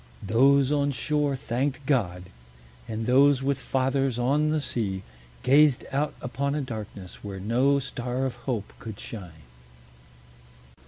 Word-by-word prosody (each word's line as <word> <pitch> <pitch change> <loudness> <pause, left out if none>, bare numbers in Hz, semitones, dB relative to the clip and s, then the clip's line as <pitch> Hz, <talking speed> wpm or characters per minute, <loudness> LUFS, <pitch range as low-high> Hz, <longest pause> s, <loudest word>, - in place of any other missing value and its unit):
Those 135 +6 +4
on 145 -1 +2
shore 145 0 0
thanked 130 +2 -2
God; 95 -11 0 0.6
and 110 0 -3
those 135 +2 +5
with 140 -1 0
fathers 135 -1 0
on 140 +5 +2
the 155 0 +1
sea 100 -9 -2 0.4
gazed 140 0 +5
out 145 +3 -1
upon 140 +3 -1
a 150 - 0
darkness 110 -7 -7
where 100 -2 -6
no 125 +8 +2
star 125 -1 -3
of 130 - -2 0.2
hope 110 -5 -2
could 110 -3 -8
shine. 85 -8 -9
130 Hz, 130 wpm, -26 LUFS, 110-140 Hz, 0.6 s, those